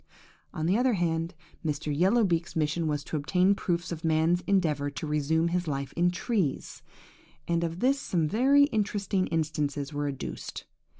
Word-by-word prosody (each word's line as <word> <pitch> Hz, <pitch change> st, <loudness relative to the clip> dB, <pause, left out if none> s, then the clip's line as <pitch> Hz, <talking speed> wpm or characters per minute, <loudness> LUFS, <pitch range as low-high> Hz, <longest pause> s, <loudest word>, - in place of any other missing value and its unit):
"On 155 Hz, -, -3 dB
the 190 Hz, +7 st, +2 dB
other 250 Hz, -1 st, +3 dB
hand, 165 Hz, -1 st, -1 dB, 0.3 s
Mr. 150 Hz, -1 st, -2 dB
Yellow 195 Hz, +9 st, +3 dB
beak's 170 Hz, -3 st, 0 dB
mission 160 Hz, +1 st, 0 dB
was 145 Hz, -1 st, -1 dB
to 155 Hz, -, -3 dB
obtain 180 Hz, +6 st, +3 dB
proofs 175 Hz, -3 st, -2 dB
of 165 Hz, 0 st, -5 dB
man's 160 Hz, +2 st, +2 dB
endeavour 160 Hz, -8 st, +1 dB
to 145 Hz, -, -6 dB
resume 155 Hz, +2 st, +1 dB
his 180 Hz, 0 st, -1 dB
life 140 Hz, -2 st, -3 dB
in 175 Hz, +1 st, +2 dB
trees; 180 Hz, -, -2 dB, 0.7 s
and 170 Hz, 0 st, +1 dB
of 170 Hz, +1 st, -3 dB
this 275 Hz, +2 st, +3 dB
some 165 Hz, -10 st, 0 dB
very 270 Hz, -, +4 dB
interesting 205 Hz, -6 st, 0 dB
instances 150 Hz, -3 st, -2 dB
were 145 Hz, 0 st, -1 dB
adduced. 140 Hz, -2 st, -6 dB
165 Hz, 165 wpm, -28 LUFS, 150-185 Hz, 0.7 s, very